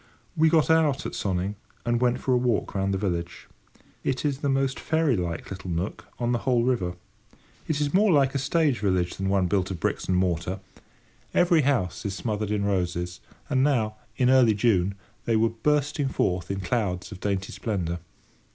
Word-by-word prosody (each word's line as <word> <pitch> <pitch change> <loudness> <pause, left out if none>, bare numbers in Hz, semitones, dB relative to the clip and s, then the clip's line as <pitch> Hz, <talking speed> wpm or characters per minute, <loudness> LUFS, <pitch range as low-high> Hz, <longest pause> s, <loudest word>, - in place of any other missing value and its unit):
We 160 +1 +4
got 160 -2 +3
out 155 -4 +3
at - - -4
Sonning, 95 0 -1 0.3
and 120 0 +1
went 125 0 +2
for 130 - +1
a - - +4
walk 120 -3 0
round 95 0 0
the 95 - 0
village. 85 -3 -3 0.6
It 130 +2 -1
is 140 -2 0
the 145 - -1
most 135 0 +1
fairy 160 -5 +1
like 85 -2 -4
little 95 -1 -6
nook 85 +4 -3
on 120 0 0
the 120 - +1
whole 125 -2 +2
river. 95 -9 0 0.7
It 155 -2 0
is 145 -1 0
more 200 +2 +4
like 140 -4 +4
a 140 - 0
stage 145 -1 +1
village 95 -3 +1
than 95 0 -1
one 95 -1 +2
built 95 0 0
of 90 -3 -5
bricks - - -1
and 90 - +2
mortar. 90 +1 0 0.8
Every 175 -2 +5
house 120 - 0
is 100 -2 -3
smothered 105 -1 -2
in 105 -1 0
roses, 90 -2 -1 0.3
and 130 -3 +2
now, 115 -7 +1 0.2
in 125 0 +4
early 125 -5 +5
June, 100 -3 +2 0.3
they 115 - +2
were 115 +1 +3
bursting 145 +4 0
forth 90 -8 -1
in 100 0 -2
clouds 90 -2 -1
of 95 - -8
dainty 100 -1 -2
splendour. 90 -6 -2
110 Hz, 190 wpm, -26 LUFS, 95-135 Hz, 0.8 s, Every